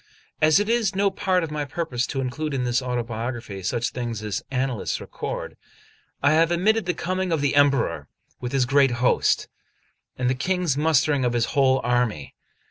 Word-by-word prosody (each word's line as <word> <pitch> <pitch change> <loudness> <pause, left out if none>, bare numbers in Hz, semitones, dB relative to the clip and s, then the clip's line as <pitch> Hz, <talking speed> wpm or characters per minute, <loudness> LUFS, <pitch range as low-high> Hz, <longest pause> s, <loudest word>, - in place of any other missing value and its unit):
As 155 +3 +5
it 205 - 0
is 225 -4 +1
no 200 0 +2
part 185 -2 0
of 160 - -4
my 150 -1 -2
purpose 140 -4 -2
to 135 - -2
include 140 +3 -3
in 130 - -1
this 120 0 +1
autobiography 120 -4 -4
such 120 +5 -1
things 120 -3 -4
as 105 -2 -3
annalists 130 -4 -2
record, - - -6 0.7
I 140 - +5
have 165 +2 +3
omitted 200 +4 +2
the 180 - 0
coming 185 +1 -2
of 160 - +1
the 145 -1 +1
Emperor 135 - +2 0.3
with 125 -1 -5
his 135 -2 +2
great 140 0 +3
host, 125 0 +2 0.7
and 125 - 0
the 130 - +2
King's 170 +3 0
mustering 150 -2 +2
of 120 -1 +1
his 120 -1 +2
whole 135 -1 +3
army. 120 - 0
135 Hz, 180 wpm, -24 LUFS, 120-160 Hz, 0.7 s, As